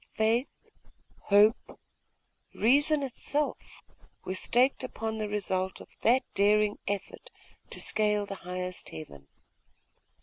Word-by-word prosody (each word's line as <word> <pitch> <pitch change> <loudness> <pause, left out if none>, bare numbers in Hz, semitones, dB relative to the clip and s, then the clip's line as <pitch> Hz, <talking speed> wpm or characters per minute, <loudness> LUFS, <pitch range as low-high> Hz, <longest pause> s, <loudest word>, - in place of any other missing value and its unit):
Faith, 225 +4 +2 0.8
hope, 210 +3 +3 0.8
reason 285 +5 +3
itself, 285 +3 -3 0.4
were 185 - -3
staked 250 +8 +2
upon 220 -3 -4
the 215 -1 -2
result 190 -2 -2
of - - -12
that 250 +3 +4
daring 210 +1 +3
effort 200 -1 -4 0.4
to - - -7
scale 210 -1 +1
the 200 - -6
highest 180 0 -5
heaven. 70 -3 -10
210 Hz, 105 wpm, -29 LUFS, 190-240 Hz, 0.8 s, that